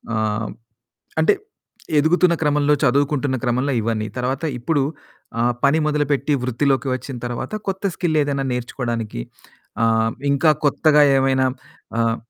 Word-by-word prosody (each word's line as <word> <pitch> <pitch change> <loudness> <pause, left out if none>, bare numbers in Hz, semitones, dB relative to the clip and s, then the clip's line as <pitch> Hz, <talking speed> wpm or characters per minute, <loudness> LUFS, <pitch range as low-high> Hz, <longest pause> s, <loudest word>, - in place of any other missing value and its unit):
ఆహ్, 110 0 -1 0.7
అంటే 185 +6 +4 0.6
ఎదుగుతున్న 170 +3 +4
క్రమంలో 150 0 +3
చదువుకుంటున్న 140 +1 +1
క్రమంలో 130 +3 0
ఇవన్నీ 110 -1 -1
తర్వాత 130 +4 -2 0.2
ఇప్పుడు 145 +4 0 0.6
ఆ - - +3 0.2
పని 145 +3 +4
మొదలుపెట్టి 145 -1 0
వృత్తిలోకి 135 +2 0
వచ్చిన 130 0 -6
తర్వాత 120 - -4 0.2
కొత్త 190 +1 -3
స్కిల్ 160 -4 0
ఏదైనా 140 -1 -1
నేర్చుకోవడానికి 120 - -3 0.6
ఆహ్, 115 0 +2 0.2
ఇంకా 145 +3 +4 0.2
కొత్తగా 150 +1 +4 0.2
ఏవైనా 130 0 +2 0.5
ఆహ్ 115 -1 +1
135 Hz, 115 wpm, -21 LUFS, 120-150 Hz, 0.7 s, అంటే